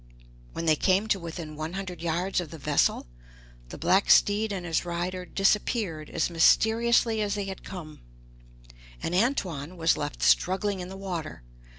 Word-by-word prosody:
When 165 - -4
they 155 -1 +4
came 190 +6 +2
to 195 - +2
within 165 -2 -7
one 155 +3 -5
hundred 185 -3 -6
yards 175 +3 -1
of 170 - -8
the 165 - -9
vessel, 135 - +1 0.6
the - - -8
black 185 +4 +2
steed 210 +1 +4
and 185 -3 -4
his 165 -2 0
rider 180 +1 -3
disappeared 195 -5 0
as - - 0
mysteriously 225 +6 +3
as 205 -1 -1
they 205 -1 -3
had 190 -1 -7
come, 165 -6 -9 1.0
and 170 - -2
Antoine 180 - -1
was 165 0 +2
left - - -4
struggling 190 - +2
in 180 - -5
the 190 - -8
water. 175 - -6
180 Hz, 165 wpm, -27 LUFS, 165-200 Hz, 1.0 s, they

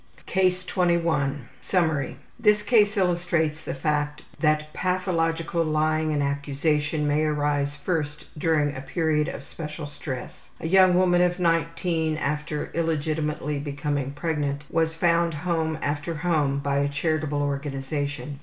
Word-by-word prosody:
Sex - - -34 0.2
affairs. 190 - +2
CASE 185 0 +2
21 165 -8 +1
Summary: 160 -7 0 0.2
This 210 -2 +4
case 210 -2 +4
illustrates 170 -4 +1
the - - -4
fact 150 +1 -1 0.2
that 155 -1 +1
pathological 170 -2 0
lying 155 0 +1
and 145 -1 +1
accusation 150 +2 0
may 145 +1 +2
arise 145 -1 0
first 150 -1 -2
during 150 -2 +1
a 130 - -5
period 155 0 0
of - - -5
special 155 -1 -7
stress. 145 -3 -7
A - - -7
young 185 0 +6
woman 180 -1 +4
of 180 0 +2
19, 165 -2 0
after 150 0 -2
illegitimately 155 -2 -1
becoming 145 -1 -2
pregnant, 145 -1 -2
was 160 0 +1
found 170 0 +2
home 160 0 -1
after 145 +3 -2
home 150 -4 +1
by 140 0 0
a 140 0 +1
charitable 150 -1 0
organization. 140 +1 -3
155 Hz, 135 wpm, -25 LUFS, 145-170 Hz, 0.2 s, young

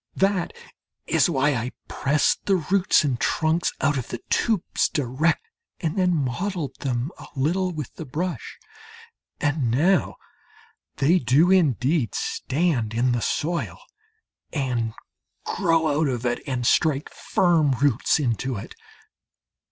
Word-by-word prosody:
That 195 -2 +1 0.5
is - - +3
why 145 -2 +2
I 120 0 -3
pressed 150 +3 +1
the 195 - +4
roots 185 +1 +2
and 130 -5 -1
trunks 160 +2 +1
out 145 -2 +2
of 125 - -6
the - - -5
tubes 220 -6 +1
direct, 145 +4 0 0.3
and 160 -3 -2
then 180 -2 +2
modelled 155 +1 -3
them 130 +2 -2
a - - -10
little 175 +7 0
with 150 -6 -6
the 160 - -8
brush. 155 +1 -4 0.8
And 145 -4 0
now 160 +9 +2 0.8
they 165 +7 +3
do 140 +8 +3
indeed 140 - +2
stand 130 -8 -1
in 125 +2 +2
the 120 -1 0
soil, 170 +8 -2 0.7
and 120 -6 -2 0.5
grow 165 -4 +1
out 160 - +2
of 125 -2 -2
it, 120 0 0
and 125 -3 -2
strike 150 +2 +2
firm 165 -6 +2
roots 135 +2 +2
into 130 -1 -1
it. 100 - -8
145 Hz, 130 wpm, -24 LUFS, 125-170 Hz, 0.8 s, the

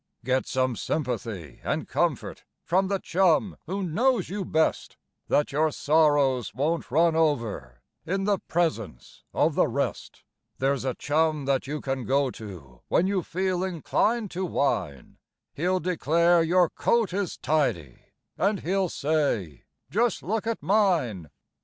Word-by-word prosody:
Get 130 +1 +1
some 130 -2 0
sympathy 110 - -4
and - - -2
comfort - - -1 0.2
from 190 +3 +2
the 195 0 0
chum 185 0 +2
who 195 +3 -2
knows 235 +9 +1
you 200 +1 -3
best, 160 -2 0 0.3
Then 145 - +3
your 155 +2 +1
sorrows 145 -7 +2
won't 155 +6 -1
run 165 +4 +3
over 115 - -1 0.2
in 195 +4 -2
the 200 -1 +1
presence 160 - -3
of - - +2
the - - +3
rest; - - -3 0.3
There's 135 0 0
a 130 - -1
chum 155 -1 0
that 135 -1 0
you 150 +1 -4
can 135 -2 -3
go 135 0 +1
to 85 - -11
when 175 - +2
you 195 -1 +1
feel 185 +1 -1
inclined 200 +5 0
to 185 +2 -3
whine, 135 - -2 0.3
He'll 180 +4 0
declare 170 0 +3
your 175 +2 +4
coat 230 -6 +1
is 195 -2 -2
tidy, 90 - -1 0.4
and 200 +1 +1
he'll 190 +1 0
say: 140 - -1 0.3
"Just 230 +1 +1
look 220 +3 -2
at 230 - -2
mine 165 - +1
160 Hz, 140 wpm, -26 LUFS, 130-185 Hz, 0.4 s, your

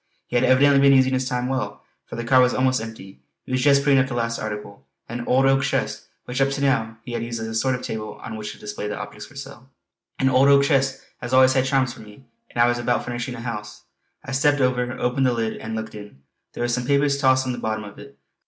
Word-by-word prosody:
He - - -7
had 120 - +3
evidently 140 +2 +5
been 140 -1 +6
using 130 0 +3
his 130 -1 -1
time 125 0 -1
well, 130 0 -3 0.2
for - - -8
the 120 - -4
cart 130 +2 +5
was 125 0 +3
almost 130 -2 +2
empty. 110 -4 -10 0.2
He - - -10
was 130 0 +1
just 140 0 +4
putting 140 -2 +4
up 135 - +2
the 125 - -5
last 115 -1 -1
article, 105 -4 -6 0.2
an 120 +1 -6
old 130 +2 +3
oak 135 0 +4
chest 140 - -2 0.2
which 125 +2 -3
up 135 - +3
to 140 0 -3
now 115 -5 0
he 120 - -8
had 115 -1 -3
used 115 0 -4
as 110 - -4
a 110 - -5
sort 125 +4 +1
of 125 - -7
table 110 -1 -5
on 115 - -6
which 105 -1 -6
to - - -15
display 105 0 -6
the 105 - -4
object 105 0 -8
for 145 - -19
sale. 135 -1 -10 0.5
An 130 - +1
old 130 +1 +4
oak 140 0 +6
chest 135 -1 +1 0.2
has 125 +1 -1
always 130 0 +6 0.2
charms 130 -3 +1
for - - -13
me, 105 +4 -15 0.3
and - - -7
I 120 - +6
was 120 0 0
about 120 0 0
furnishing 120 +1 -4
a 115 - -8
house. 105 -3 -6 0.4
I 135 - -6
stepped 145 +2 +2
over, 125 -1 +1
opened 125 +2 +1
the 125 - +2
lid 115 -1 -2
and 110 0 -6
looked 110 0 -5
in; 105 -10 -12 0.3
there - - -4
were - - +1
some 120 +1 -2
papers 140 0 +2
tossed 130 -1 +3
on 130 - -1
the 120 - -5
bottom 110 -1 -3
of 100 -1 -11
it. 140 0 -13
125 Hz, 265 wpm, -23 LUFS, 115-135 Hz, 0.5 s, been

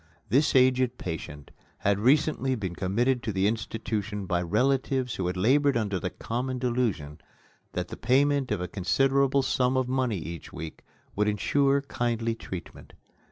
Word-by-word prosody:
This 140 +4 +3
aged 130 -1 +4
patient 75 -4 -6 0.3
had 100 0 +1
recently 135 +2 +2
been 95 -7 -4
committed 120 +8 +1
to 110 - -3
the 95 0 0
institution 110 -2 -2
by 90 -1 0
relatives 130 +6 +1
who 95 - -2
had 90 +1 -2
labored 135 +7 +3
under 100 -4 -1
the 90 - -2
common 125 +6 -3
delusion 115 - -1 0.5
that 90 0 -3
the - - -7
payment 140 +1 +2
of 105 -4 0
a 90 - -2
considerable 135 +8 +2
sum 130 0 +1
of 130 -1 +1
money 130 -4 0
each 85 -2 -7
week 80 +1 -8 0.3
would 105 +1 +1
insure 140 +7 +2
kindly 115 -3 -1
treatment. 95 -5 -9
120 Hz, 155 wpm, -27 LUFS, 95-130 Hz, 0.5 s, aged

